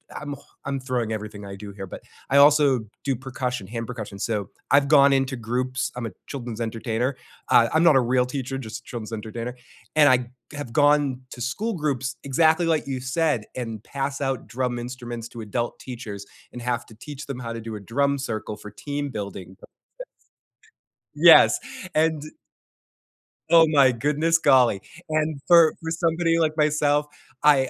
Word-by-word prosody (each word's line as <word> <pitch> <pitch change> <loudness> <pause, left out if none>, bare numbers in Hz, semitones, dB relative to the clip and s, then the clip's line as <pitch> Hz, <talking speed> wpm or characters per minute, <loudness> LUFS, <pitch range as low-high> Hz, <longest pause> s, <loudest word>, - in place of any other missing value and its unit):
I'm 145 -1 -5
ho 140 0 -7
throwing 120 -4 -1
everything 105 -2 -6
I 100 - -7
do 100 +1 -9
here, 95 -1 -8
but - - -9 0.3
I 140 - +3
also 140 -3 +6 0.2
do 135 -1 0
percussion, 125 -3 -4
hand 115 +3 -5
percussion. 110 -5 -7
So, 105 -3 -2 0.2
I've 140 0 +4
gone 140 -2 +6
into 135 0 +1
groups 125 +2 -2
I'm 125 -1 -4
a 115 - -5 0.2
children's 120 -4 -6
entertainer. 115 +3 -2 0.3
I 115 -1 +5
I'm 160 - +4
not 170 -4 +6
a 135 - +6
real 125 +1 +2
teacher, 135 0 -4
just 110 -4 -7
a - - -38
children's 115 -2 -7
entertainer. 115 +3 -5 0.4
And 150 -2 +6
I 125 -2 +3 0.3
have 145 -5 -6
gone 145 -1 +3
to 120 - -9
school 205 - -2
groups, 140 - -2
exactly 160 +5 +3
like 160 -2 +1
you 135 -2 -3
said, 130 -2 0
and 115 -4 -5
pass 140 0 -4
out 135 -3 -2
drum 125 0 -2
instruments 120 -1 -6
to 120 - -9
adult 120 +3 -3
teachers 110 -6 -8 0.3
and 125 - -7
have 120 0 -2
to - - -16
teach 145 +6 -9
them 135 -3 -6
how 115 -2 -5
to 115 - -5
do 115 -1 -6
a - - -8
drum 140 +7 0
circle 110 -5 -4
for 105 0 -10
team 145 +7 -4
building 100 -5 -7
success. - - -17 1.5
Yes, - - +8 0.4
and 160 -1 +2 1.3
Oh 165 -1 +7
my 140 -4 +5
goodness, 150 +6 +1
golly. 130 -9 +4 0.3
And 155 -1 0
for 170 -2 +6
for 160 0 -4
somebody 165 0 +1
like 155 -1 +1
myself, 150 -1 +2 0.4
I 140 -3 +5
130 Hz, 175 wpm, -24 LUFS, 115-145 Hz, 1.5 s, Yes